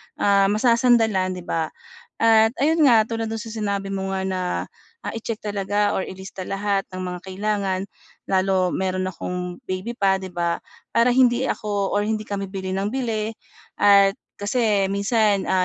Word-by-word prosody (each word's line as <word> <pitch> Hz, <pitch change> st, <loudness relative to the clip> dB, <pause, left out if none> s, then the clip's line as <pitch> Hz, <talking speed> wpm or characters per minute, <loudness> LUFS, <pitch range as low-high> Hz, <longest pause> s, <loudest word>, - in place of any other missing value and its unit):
ah, 200 Hz, -1 st, +3 dB
masasandalan, 220 Hz, -3 st, +3 dB
'di 180 Hz, -, -8 dB
ba? 165 Hz, -2 st, -1 dB, 0.5 s
At 225 Hz, -1 st, +5 dB
ayun 315 Hz, +4 st, +3 dB
nga, 230 Hz, -6 st, +6 dB
tulad 225 Hz, -1 st, -3 dB
do'n 225 Hz, -, -3 dB
sa 225 Hz, 0 st, -7 dB
sinabi 200 Hz, -3 st, -2 dB
mo 195 Hz, -1 st, -3 dB
nga 190 Hz, 0 st, -2 dB
na, 190 Hz, -1 st, -2 dB, 0.7 s
ah, -, -, -3 dB
i-check 225 Hz, -1 st, -4 dB
talaga 205 Hz, 0 st, 0 dB
or -, -, 0 dB
ilista 190 Hz, 0 st, -8 dB
lahat 195 Hz, +1 st, -1 dB
ng 185 Hz, -, -7 dB
mga 180 Hz, 0 st, -4 dB
kailangan. 195 Hz, 0 st, -1 dB, 0.5 s
Lalo 190 Hz, -1 st, +2 dB
mayroon 185 Hz, 0 st, -1 dB
akong 180 Hz, -1 st, -5 dB
baby 185 Hz, +6 st, -4 dB
pa, 195 Hz, -2 st, +2 dB
'di 190 Hz, -, -6 dB
ba? 170 Hz, -1 st, 0 dB, 0.3 s
Para 240 Hz, +1 st, +4 dB
hindi 250 Hz, 0 st, +4 dB
ako 205 Hz, -2 st, -1 dB
or 205 Hz, -, +2 dB
hindi 215 Hz, 0 st, -2 dB
kami 200 Hz, -1 st, -3 dB
bili 190 Hz, -1 st, -4 dB
ng 195 Hz, +2 st, -1 dB
bili 225 Hz, -5 st, -1 dB, 0.5 s
at 200 Hz, -1 st, +5 dB, 0.2 s
kasi 205 Hz, -1 st, +1 dB
minsan, 200 Hz, 0 st, +1 dB
ah, 185 Hz, -1 st, +3 dB
200 Hz, 165 wpm, -23 LUFS, 190-220 Hz, 0.7 s, nga